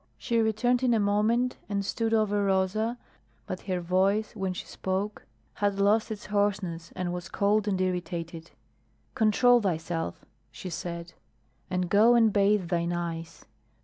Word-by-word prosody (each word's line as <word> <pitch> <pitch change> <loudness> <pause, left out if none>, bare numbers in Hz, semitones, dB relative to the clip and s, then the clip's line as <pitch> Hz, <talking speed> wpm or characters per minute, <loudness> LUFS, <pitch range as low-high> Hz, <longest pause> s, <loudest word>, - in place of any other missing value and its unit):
She 235 -1 0
returned 225 +3 +2
in 245 -2 +3
a - - +2
moment 215 +5 +1
and 200 -1 -1
stood 225 +2 -1
over 210 -2 +2
Rosa, 200 +5 +1 0.5
but 185 - -5
her 185 -1 0
voice 190 +5 +1
when 190 -3 -2
she 180 - -6
spoke 195 +3 -4 0.3
had 200 -1 -1
lost 210 +3 +3
its 215 -2 -6
hoarseness 200 -5 -1
and 175 -1 -2
was 180 +1 -6
cold 205 +1 +1
and 190 -2 0
irritated. 170 -2 -3 0.6
"Control 240 +3 +4
thyself," 165 - -3 0.2
she 185 - -8
said. 170 0 -5 0.6
"And 180 0 -1
go 215 +6 +5
and 225 -3 +4
bathe 200 -3 +2
thine 170 -1 0
eyes. 165 -1 -5
200 Hz, 145 wpm, -28 LUFS, 180-215 Hz, 0.6 s, go